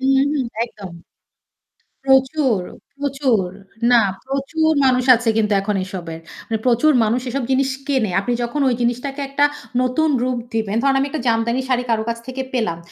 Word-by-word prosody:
হুম, 270 +1 +3 0.2
হুম 265 -4 -1 0.2
একদম। 200 -6 -10 1.1
প্রচুর, 265 -4 +3 0.4
প্রচুর। 270 -8 0 0.4
না, 235 -2 +7 0.2
প্রচুর 275 +4 0
মানুষ 255 -1 +3
আছে 230 0 -1
কিন্তু 210 -1 +2
এখন 205 +1 -1
এসবের। 170 -4 -7 0.3
মানে 225 - -1
প্রচুর 250 +6 +4
মানুষ 235 +3 +1
এসব 265 +1 -2
জিনিস 265 0 +2 0.2
কেনে। 255 -8 +1
আপনি 240 +5 -1
যখন 240 +5 -2
ওই - - +1
জিনিসটাকে 250 +4 -2
একটা 285 +1 +3 0.4
নতুন 280 +5 +1
রূপ 255 -1 -1 0.2
দিবেন, 220 -2 -1
ধরুন 275 0 +2
আমি 275 - +1
একটা 300 -2 -4
জামদানি 230 +2 +1
শাড়ি 250 -1 +1
কারো 220 -1 +1
কাছ 230 - -2
থেকে 260 +1 -4
পেলাম। 220 -10 -1
250 Hz, 165 wpm, -20 LUFS, 225-270 Hz, 1.1 s, না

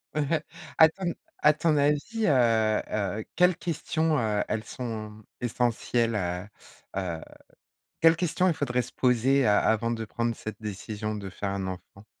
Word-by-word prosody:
Mmh. 150 -1 +1 0.5
À 160 -1 +8
ton 175 0 -3 0.3
à 150 - +6
ton 155 +1 +1
avis, 150 +10 +1
heu 115 -6 +3
heu, 105 0 -2
quelles 180 -1 +4
questions, 160 -2 0
heu, 105 -2 +1
elles 110 0 -2
sont 110 -3 -6 0.2
essentielles, 120 -1 0
heu 90 -1 -2 0.5
heu, 85 -3 -4 0.8
quelles 165 0 +6
questions 180 +2 +1
il - - +2
faudrait 125 -4 0
se - - -9
poser 130 +2 +3
a 105 -1 +5
avant 115 +1 +1
de 115 -1 -2
prendre 115 +1 -2
cette 110 +1 -8
décision 105 +1 -4
de 100 -2 -6
faire 100 +1 -4
un 95 -1 -3
enfant? 95 +2 -9
115 Hz, 155 wpm, -27 LUFS, 105-150 Hz, 0.8 s, À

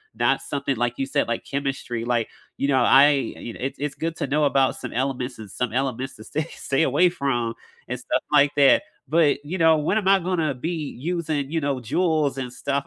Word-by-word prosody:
not - - +2
something 140 -1 -2
like 120 +1 -1
you 135 - -1
said, 140 +1 0
like 115 - -2
chemistry, 135 -4 -3
like, 120 -2 0 0.3
you 140 - 0
know, 135 -2 +3
I 140 +2 +7
you 135 -4 -3
know, - - -12
it's 135 +2 -4
it's 145 0 -3
good 165 0 -3
to - - -2
know 150 +3 +1
about 135 -2 +2
some - - -7
elements 130 -1 -2
and 105 - -9
some 125 +3 -3
elements 130 0 -2
to 110 - -11
stay 155 - -2
stay 135 +3 0
away 180 +2 +4
from 120 -8 -1 0.3
and 125 +1 -4
stuff 125 - -1
like 145 -1 +5
that. 140 -2 +5 0.2
But 150 -1 +3
you 175 +6 -3
know, 160 -2 +5
when 155 +7 0
am 205 -3 -1
I 195 0 +6
gonna 170 -5 0
be 155 +3 -4
using, 155 -3 -2
you 165 +1 -1
know, 140 -2 0
joules 150 +3 0
and 125 -2 -4
stuff? 140 +2 -2
140 Hz, 220 wpm, -24 LUFS, 125-155 Hz, 0.3 s, I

